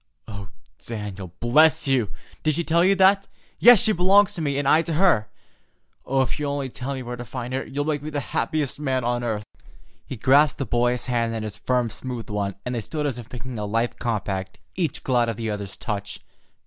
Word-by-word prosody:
"Oh, 100 -2 -7 0.4
Daniel, 100 -5 -6
bless 150 +6 +4
you! 125 -6 +2 0.3
Did 155 -2 +1
she 170 - -1
tell 170 +1 +3
you 195 +2 +4
that? 195 +1 +4 0.3
Yes, 240 -2 +9
she 220 - +4
belongs 200 +2 +4
to 175 - -5
me, 140 -3 -1
and 145 -1 -1
I 155 +3 +5
to 165 0 -3
her, 155 - +3 0.8
and 135 0 +2
if 130 - -4
you'll 145 -1 -1
only 140 -2 -3
tell 135 +3 -4
me 130 - -5
where 125 0 -5
to 120 - -7
find 125 +1 -6
her, 135 - -1
you'll 145 +1 -3
make 150 -2 -1
me 150 - -5
the 145 -1 -2
happiest 145 +3 -1
man 130 -4 -1
on 120 0 -1
earth!" 110 -3 -2 0.6
He - - -5
grasped 140 +4 +4
the 135 - -2
boy's 120 0 +1
hand 115 -2 0
in 110 - -3
his 105 -2 -5
firm, 120 +1 0
smooth 125 -4 -6
one, 100 -2 -2
and 125 - -2
they 120 - -2
stood 150 +6 -3
as 130 -4 -2
if 120 0 -11
making 125 -2 -6
a 105 - -2
life 115 +3 -1
compact, 95 -5 -3 0.2
each 165 -5 -2
glad 120 -3 +2
of 115 - -4
the 115 -2 -2
other's 100 -2 -6
touch. 105 -2 -4
125 Hz, 220 wpm, -24 LUFS, 115-150 Hz, 0.8 s, Yes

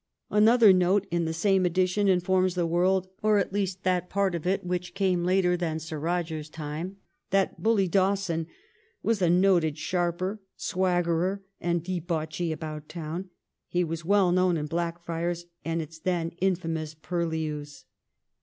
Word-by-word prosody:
Another 215 0 +6
note 185 +2 +3
in 170 -1 +1
the 160 - -1
same 190 +2 +2
edition 185 +3 +2
informs 185 0 +2
the 175 -1 +1
world, 180 +3 +2
or 215 -1 +4
at 195 -1 0
least 195 -2 -2
that 180 -1 0
part 200 -2 +1
of 170 0 -3
it 190 +1 +1
which 180 0 -3
came 185 -3 +1
later 180 0 +3
than 170 -3 -2
Sir 160 -1 -6
Eoger's 160 -2 -2
time, 155 +5 -5 0.3
that 195 0 +1
bully 215 -4 +3
Dawson 185 -3 +1 0.6
'was 225 -3 +1
a 175 - +4
noted 175 -4 +3
sharper, 180 +4 -1 0.2
swaggerer^ 180 0 0 0.2
and 170 -1 0
debauchee 170 -2 -2
about 155 -1 -6
town; 170 +3 -5 0.4
he 180 0 +1
was 165 0 -4
well 195 0 +3
known 180 -1 +3
in 150 - -2
Blackfriars 170 +1 -3 0.2
and 165 0 -1
its 160 +1 -12
then 170 -1 -1
infamous 165 -4 -1
purlieus.' 155 -3 -3
175 Hz, 150 wpm, -27 LUFS, 165-190 Hz, 0.6 s, Another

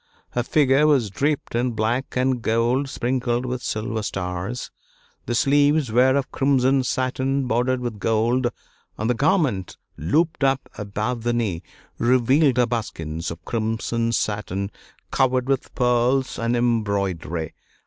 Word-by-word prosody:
Her 120 - 0
figure 140 +3 +3
was 130 -9 +2
draped 145 +7 -1
in 120 +1 0
black 115 +4 -1
and 130 -1 +1
gold 120 +5 +1
sprinkled 125 -1 -1
with 125 0 -3
silver 110 0 -2
stars, 95 +4 -4 0.6
the 120 - 0
sleeves 145 0 +3
were 130 +3 +4
of 140 -1 -1
crimson 135 -1 +2
satin 130 +2 -1
bordered 125 +1 +1
with 120 -4 -4
gold, 115 +4 +1 0.5
and 110 - -2
the 125 - +3
garment, 135 - +1 0.2
looped 150 - +1
up 135 -1 +1
above 110 +4 -3
the 120 +1 0
knee, 105 -8 -1 0.4
revealed 130 +3 +3
her 125 - +5
buskins 85 -9 -4
of 85 -1 -9
crimson 115 +1 -1
satin 105 -3 -2 0.4
covered 130 -1 +2
with 135 -1 -1
pearls 125 +2 +1
and 115 +1 0
embroidery. 100 -9 -1
120 Hz, 135 wpm, -23 LUFS, 110-130 Hz, 0.6 s, her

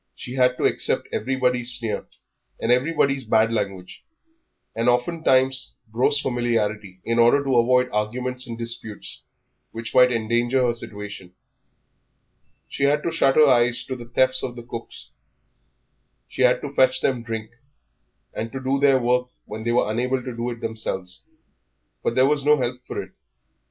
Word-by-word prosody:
She 125 - -8
had 125 -1 +2
to - - -3
accept - - 0
everybody's 125 -2 +1
sneer 115 -3 -3 0.5
and 115 - 0
everybody's 140 +1 +2
bad 110 0 +2
language, 100 -4 -4 0.7
and 115 +2 +1
oftentimes 130 -1 +1 0.2
gross 130 +5 +2
familiarity, 110 -7 -2
in 115 0 0
order 120 +5 +5
to 135 -3 +1
avoid 125 +2 +4
arguments 125 +4 -3
and 115 -1 -6
disputes 115 -2 -6 0.5
which 115 0 -7
might 125 0 +6
endanger 120 +3 +1
her 120 - +1
situation. 105 -5 -8 1.3
She 140 - -1
had 145 +1 +2
to 170 - -1
shut 135 -4 +2
her 155 - +7
eyes 120 -3 +3
to 130 - -5
the 120 -2 -9
thefts 130 +1 +2
of 125 -1 -5
cooks; 115 -1 -9 1.2
she - - -6
had 125 -1 +4
to 145 -1 -6
fetch 130 -1 +3
them 130 -3 0
drink, 115 -1 -5 0.8
and 115 +1 -4
to 135 - -4
do 135 +1 0
their 140 -1 +5
work 125 0 +1 0.2
when 110 +1 -7
they 120 - 0
were 120 - +2
unable 125 +3 -1
to 125 -2 -6
do 120 +1 -3
it 120 -1 -7
themselves. 95 -5 -4 0.8
But 115 - -1
there 130 - +5
was 145 0 +2
no 150 +1 +5
help 125 -1 -3
for - - -4
it. - - -16
125 Hz, 160 wpm, -23 LUFS, 115-130 Hz, 1.3 s, her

